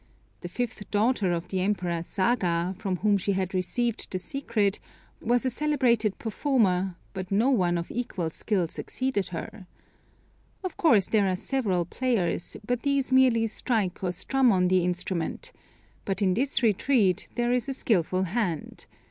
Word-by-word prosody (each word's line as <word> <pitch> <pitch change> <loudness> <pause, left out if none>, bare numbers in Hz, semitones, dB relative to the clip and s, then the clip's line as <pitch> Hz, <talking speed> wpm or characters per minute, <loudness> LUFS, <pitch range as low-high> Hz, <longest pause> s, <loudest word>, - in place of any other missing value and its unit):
The - - -7
fifth 240 -4 -4
daughter 210 -2 +2
of 170 -1 -3
the 190 -1 -1
Emperor 180 -4 -1
Saga, 185 -2 0
from 195 -1 -2
whom 205 +2 +2
she 200 +2 0
had 190 0 -2
received 225 +6 -1
the 185 - -2
secret, 215 -3 -1 0.4
was 240 +2 +1
a 260 - +1
celebrated 240 -8 +1
performer, 205 -7 +1 0.2
but 185 -1 -6
no 225 +7 +3
one 180 -8 +2
of 170 - -5
equal 195 -9 -3
skill 185 -1 -1
succeeded 255 +3 -2
her. 185 +3 -7 1.0
Of 370 - -4
course 220 - +4
there 210 -3 +3
are 185 - +1
several 190 -6 -1
players, 205 -5 -1
but 245 +1 -1
these 280 -2 0
merely 255 -3 +5
strike 215 -4 -1
or 180 - 0
strum 250 +8 +2
on 180 -2 +3
the 185 -1 +3
instrument; 180 - -2 0.5
but 195 +1 -1
in 185 -2 +3
this 265 +5 0
retreat 215 -3 +2
there 240 0 +1
is 250 +1 0
a - - -1
skilful 185 -7 +1
hand. 185 -4 -3
205 Hz, 155 wpm, -27 LUFS, 185-245 Hz, 1.0 s, merely